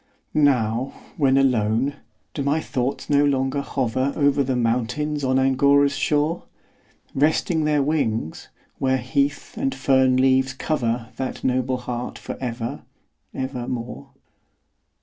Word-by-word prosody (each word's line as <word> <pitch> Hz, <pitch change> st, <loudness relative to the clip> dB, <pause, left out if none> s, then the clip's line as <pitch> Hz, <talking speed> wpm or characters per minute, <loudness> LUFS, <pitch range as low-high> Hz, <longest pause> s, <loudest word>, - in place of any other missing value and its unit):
Now, 130 Hz, -4 st, +2 dB, 0.2 s
when 135 Hz, -3 st, +3 dB
alone, 130 Hz, +1 st, +2 dB, 0.4 s
do 145 Hz, -, -3 dB
my 140 Hz, +3 st, +1 dB
thoughts 130 Hz, -3 st, -3 dB
no 145 Hz, 0 st, +4 dB
longer 135 Hz, 0 st, +1 dB
hover 130 Hz, 0 st, -1 dB
Over 140 Hz, -1 st, +3 dB
the 130 Hz, -1 st, -1 dB
mountains 125 Hz, +5 st, -1 dB
on 130 Hz, 0 st, +2 dB
Angora's 140 Hz, +1 st, +3 dB
shore, 150 Hz, +4 st, 0 dB, 0.7 s
Resting 155 Hz, +2 st, +1 dB
their 150 Hz, -2 st, +2 dB
wings, 115 Hz, -, -1 dB, 0.3 s
where 130 Hz, 0 st, +2 dB
heath 140 Hz, +2 st, -1 dB
and 135 Hz, 0 st, -1 dB
fern 130 Hz, -1 st, +3 dB
leaves 130 Hz, 0 st, +3 dB
cover 120 Hz, -5 st, -1 dB
That 130 Hz, -, -4 dB
noble 130 Hz, 0 st, +1 dB
heart 125 Hz, 0 st, -5 dB
for -, -, -6 dB
ever, 120 Hz, -2 st, -4 dB, 0.5 s
ever 130 Hz, -2 st, -4 dB
more? 120 Hz, -1 st, -5 dB
130 Hz, 125 wpm, -23 LUFS, 125-140 Hz, 0.7 s, no